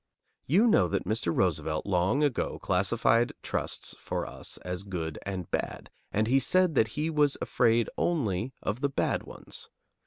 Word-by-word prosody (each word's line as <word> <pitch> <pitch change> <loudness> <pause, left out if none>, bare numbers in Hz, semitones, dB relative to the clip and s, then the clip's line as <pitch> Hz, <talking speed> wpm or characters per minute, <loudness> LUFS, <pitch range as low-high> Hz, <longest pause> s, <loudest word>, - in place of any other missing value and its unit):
You 190 - +5
know 205 - +5
that - - -1
Mr. 110 -3 0
Roosevelt 80 -1 0
long 95 +9 +2
ago 145 -5 0
classified 115 +5 +2
trusts - - -3
for - - -3
us - - -7
as 90 +1 -3
good 85 -6 -4
and 95 -3 -4
bad, - - -3 0.2
and 110 +1 +2
he 130 +4 +4
said 185 +3 +3
that 110 -5 +4
he 155 +2 0
was 150 -2 +3
afraid 115 -1 +2
only 120 - 0
of 110 +5 -2
the 140 - +2
bad 135 - 0
ones. - - -7
110 Hz, 160 wpm, -29 LUFS, 90-140 Hz, 0.2 s, You